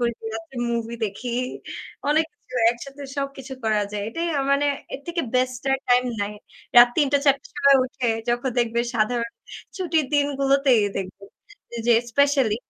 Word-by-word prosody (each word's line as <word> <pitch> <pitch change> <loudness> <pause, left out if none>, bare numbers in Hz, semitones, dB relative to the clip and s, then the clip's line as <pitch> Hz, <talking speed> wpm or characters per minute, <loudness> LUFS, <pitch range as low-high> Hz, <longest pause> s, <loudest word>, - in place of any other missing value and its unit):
করি, 235 -1 0 0.2
রাত্রে 225 +3 -8 0.2
মুভি 230 0 -2
দেখি, 220 +4 -5 0.8
অনেক 315 +2 +4
কিছু, 255 - -17 0.2
একসাথে 275 +4 -8
সবকিছু 275 -1 -5
করা 215 -1 +2
যায়। 205 -1 -3
এটাই 330 +9 -3
আ - - +2
মানে 285 +1 +2 0.3
এর - - -6
থেকে 340 0 -2
বেস্ট 255 -1 0
আর 270 - +1
টাইম 245 0 +4 0.2
নাই। 205 +1 -2 0.4
রাত 240 0 +10
৩ঃ০০-৪ঃ০০ 280 -2 +2
র - - -27
সময় 280 -1 +5
উঠে, 255 -1 -3 0.2
যখন 240 +2 0
দেখবে 235 -1 +1
সাধারণ 235 +1 0 0.5
ছুটির 325 -6 0
দিনগুলোতেই 275 -4 +3
দেখব 190 0 -5 0.5
যে, 235 - -7
যে - - +7 0.2
স্পেশালি 275 -5 +3
255 Hz, 155 wpm, -23 LUFS, 235-280 Hz, 0.8 s, রাত